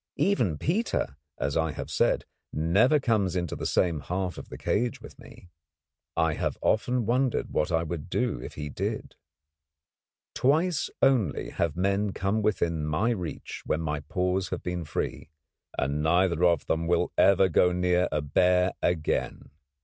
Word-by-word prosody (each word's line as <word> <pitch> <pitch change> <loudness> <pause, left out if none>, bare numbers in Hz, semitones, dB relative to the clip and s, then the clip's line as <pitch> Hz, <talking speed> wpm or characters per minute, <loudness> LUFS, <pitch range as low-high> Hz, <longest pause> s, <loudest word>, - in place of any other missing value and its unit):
Even 120 - +1
Peter, 170 - -1 0.2
as 70 0 -2
I 80 -1 +1
have - - -6
said, - - +2 0.3
never 100 - +3
comes 110 -8 +1
into 85 -3 -2
the - - -3
same 85 -4 +1
half 90 +3 -3
of - - -10
the - - -8
cage 120 +2 -1
with - - -13
me. 90 - -15 0.7
I - - +2
have - - -2
often 125 +2 +1
wondered 125 +2 0
what 75 +4 0
I 80 0 +2
would 85 +1 -5
do 120 - -1
if - - -8
he 75 -1 -5
did. 70 - -4 1.2
Twice 160 +5 +2
only 125 - +2
have 85 -1 -1
men 100 +2 +1
come 100 +4 0
within 85 -7 0
my 75 +10 +1
reach 90 -8 -5
when 80 - -1
my 75 -2 -2
paws 90 +4 -1
have - - -4
been 90 -2 -3
free, 75 0 -4 0.5
and 70 +3 0
neither 85 +2 +2
of 85 -4 +3
them 80 +1 -1
will 85 0 +1
ever 95 -1 +5
go 90 +1 +4
too 90 - -2
near 90 0 +2
a 75 - -1
bear 90 +5 +3
again. 80 -5 -1
90 Hz, 165 wpm, -27 LUFS, 80-105 Hz, 1.2 s, ever